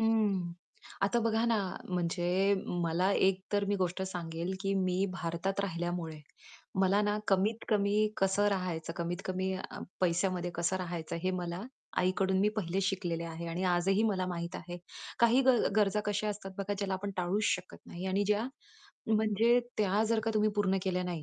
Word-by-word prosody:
हं, 210 Hz, -6 st, +2 dB, 0.5 s
आता 205 Hz, +4 st, +3 dB
बघा 225 Hz, 0 st, +2 dB
ना, 230 Hz, -1 st, +3 dB, 0.3 s
म्हणजे 180 Hz, +2 st, +1 dB
मला 175 Hz, +2 st, +1 dB
एक 190 Hz, -1 st, +3 dB
तर 205 Hz, 0 st, +2 dB
मी 205 Hz, +1 st, 0 dB
गोष्ट 185 Hz, -1 st, -1 dB
सांगेल, 175 Hz, -1 st, -3 dB
की 195 Hz, -, 0 dB
मी 185 Hz, 0 st, +1 dB
भारतात 175 Hz, +3 st, -2 dB
राहिल्यामुळे, 175 Hz, -4 st, -3 dB, 0.6 s
मला 195 Hz, +2 st, +4 dB
ना 210 Hz, 0 st, +1 dB
कमीत-कमी 205 Hz, +1 st, +2 dB, 0.2 s
कसं 195 Hz, +2 st, +2 dB
राहायचं, 180 Hz, -5 st, -2 dB
कमीत-कमी 185 Hz, +2 st, -2 dB
अ, 185 Hz, -, -6 dB, 0.2 s
पैशामध्ये 180 Hz, 0 st, +1 dB
कसं 170 Hz, +2 st, 0 dB
राहायचं 175 Hz, -3 st, -4 dB
हे 185 Hz, -, +1 dB
मला 175 Hz, 0 st, -3 dB, 0.4 s
आईकडून 190 Hz, +1 st, +2 dB
मी 205 Hz, -, +4 dB
पहिलेच 190 Hz, 0 st, 0 dB
शिकलेले 175 Hz, -3 st, -1 dB
आहे 165 Hz, +1 st, -6 dB
आणि 170 Hz, +2 st, -3 dB
आजही 185 Hz, +3 st, +3 dB
मला 195 Hz, -4 st, +1 dB
माहीत 170 Hz, -1 st, -4 dB
आहे. 175 Hz, 0 st, -7 dB, 0.4 s
काही 235 Hz, +2 st, +5 dB
ग 260 Hz, -2 st, +7 dB, 0.2 s
गरजा 210 Hz, 0 st, +3 dB
कशा 210 Hz, +1 st, 0 dB
असतात 200 Hz, -2 st, -5 dB
बघा, 200 Hz, +1 st, -1 dB
ज्याला 195 Hz, -1 st, -1 dB
आपण 200 Hz, +2 st, -3 dB
टाळूच 185 Hz, +4 st, 0 dB
शकत 180 Hz, -3 st, -1 dB
नाही 180 Hz, +2 st, -6 dB
आणि 195 Hz, +2 st, +1 dB
ज्या 210 Hz, +3 st, +2 dB, 0.7 s
म्हणजे 220 Hz, +2 st, +4 dB, 0.2 s
त्या 205 Hz, +1 st, +3 dB
जर 225 Hz, -1 st, +2 dB
का 225 Hz, -, +1 dB
तुम्ही 215 Hz, 0 st, +3 dB
पूर्ण 195 Hz, -2 st, +2 dB
केल्या 180 Hz, -1 st, 0 dB
नाही, 175 Hz, -3 st, -3 dB
190 Hz, 165 wpm, -32 LUFS, 175-205 Hz, 0.7 s, ग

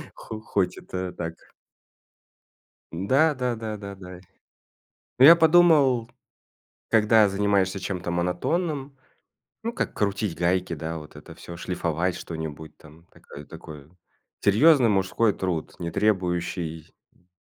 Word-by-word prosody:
Х 110 Hz, -1 st, -8 dB
хоть 100 Hz, -4 st, -1 dB
это 90 Hz, -1 st, -5 dB
так 80 Hz, -2 st, -5 dB, 1.6 s
Да 135 Hz, -, +2 dB
да 125 Hz, -2 st, -2 dB
да 110 Hz, -1 st, -5 dB
да 100 Hz, -1 st, -8 dB
да. 90 Hz, -1 st, -11 dB, 1.0 s
Ну 130 Hz, -, +6 dB
я 170 Hz, +1 st, +10 dB
подумал, 155 Hz, -8 st, +4 dB, 0.8 s
когда 110 Hz, -1 st, +4 dB
занимаешься 100 Hz, -1 st, 0 dB
чем-то 90 Hz, -1 st, -4 dB
монотонным, 135 Hz, -, -2 dB, 0.7 s
ну, 230 Hz, +1 st, -3 dB
как -, -, -3 dB
крутить 100 Hz, -3 st, -1 dB
гайки, 90 Hz, 0 st, 0 dB
да, 80 Hz, +1 st, -5 dB
вот 75 Hz, -, -14 dB
это -, -, -12 dB
всё, 85 Hz, 0 st, -10 dB
шлифовать 90 Hz, 0 st, -2 dB
что-нибудь, 80 Hz, -1 st, -7 dB
там 80 Hz, +2 st, -18 dB
такая 70 Hz, 0 st, -13 dB
такой 75 Hz, -1 st, -12 dB, 0.5 s
серьезный 125 Hz, +4 st, +5 dB
мужской 100 Hz, +2 st, +1 dB
труд, 90 Hz, -4 st, -3 dB
не 85 Hz, -1 st, -4 dB
требующий, 90 Hz, -5 st, -2 dB, 0.2 s
м 90 Hz, -, -33 dB
95 Hz, 120 wpm, -25 LUFS, 85-115 Hz, 1.6 s, я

